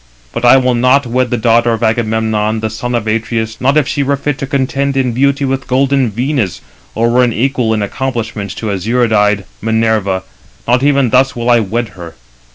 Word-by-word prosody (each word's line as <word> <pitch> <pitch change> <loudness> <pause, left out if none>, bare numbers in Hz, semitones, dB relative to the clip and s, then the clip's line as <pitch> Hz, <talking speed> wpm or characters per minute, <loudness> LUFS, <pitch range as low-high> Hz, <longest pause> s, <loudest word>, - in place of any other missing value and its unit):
But 120 - -4
I 125 +2 +7
will 130 -1 +2
not 130 +3 +3
wed 125 +1 0
the 120 - -1
daughter 115 +1 +2
of 115 - -3
Agamemnon, 110 -1 0
the 110 -1 -2
son 120 +3 -3
of 115 -2 -2
Atreus, 110 0 -2
not 135 +4 +2
if 145 -3 +2
she 145 - -1
were 140 0 +1
fit 140 -1 -3
to 135 - -4
contend 140 0 -1
in 130 -2 +1
beauty 140 +3 +1
with 135 0 -2
golden 135 -1 +1
Venus, 120 - -2 0.4
or 115 +1 +1
were 125 +1 +4
equal 120 0 0
in 110 -2 0
accomplishments 115 -3 -4
to 110 -2 -4
azure 110 +4 0
eyed 105 -2 +2 0.2
Minerva; 110 -4 0 0.4
not 125 +2 +3
even 140 -4 +2
thus 130 +1 +3
will 120 0 0
I 120 - +5
wed 115 +2 -2
her. 85 -3 -11
120 Hz, 195 wpm, -14 LUFS, 110-130 Hz, 0.4 s, I